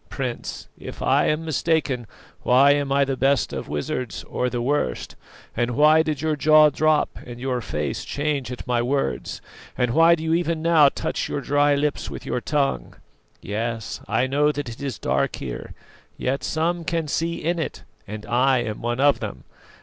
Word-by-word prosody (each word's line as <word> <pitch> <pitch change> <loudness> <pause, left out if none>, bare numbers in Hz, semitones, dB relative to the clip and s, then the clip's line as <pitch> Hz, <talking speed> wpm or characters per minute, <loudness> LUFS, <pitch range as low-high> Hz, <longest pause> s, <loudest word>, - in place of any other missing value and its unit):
Prince, 130 -3 -5
if - - -9
I - - +3
am 155 +2 0
mistaken, 155 -6 0 0.3
why 135 +3 +5
am 145 -1 0
I 140 0 +3
the 135 -1 -1
best 135 +2 +1
of - - -5
wizards, 90 +7 -3
or 125 - -2
the 125 - -3
worst, 125 - -1 0.4
and 120 0 0
why 155 +2 +6
did 155 -2 -2
your 155 -1 +1
jaw 155 0 +6
drop 155 +1 +1
and 120 0 -9
your 125 -1 -2
face 75 -9 -3
change 145 -3 -2
at 125 - -7
my 120 -1 +1
words, 125 - -2 0.4
and 125 -1 +1
why 165 +3 +6
do 160 - -7
you 160 0 0
even 165 -1 0
now 160 -4 +6
touch - - -3
your - - -2
dry 145 +1 +2
lips 145 +1 -1
with - - -8
your 125 - -2
tongue? 135 - -1 0.5
Yes, 115 +2 -4
I 115 +5 +1
know 145 +3 +2
that 145 -3 -5
it 115 +4 -9
is 135 -5 -3
dark - - 0
here, 60 -3 -7 0.4
yet 135 +2 -2
some 170 +2 -1
can 165 -1 -1
see 165 +3 -1
in 170 +2 0
it, 160 - -4 0.2
and 105 +1 -7
I 125 +2 +2
am 110 -2 -5
one 120 +1 -2
of 145 +1 +4
them. - - -6
140 Hz, 185 wpm, -23 LUFS, 120-155 Hz, 0.5 s, why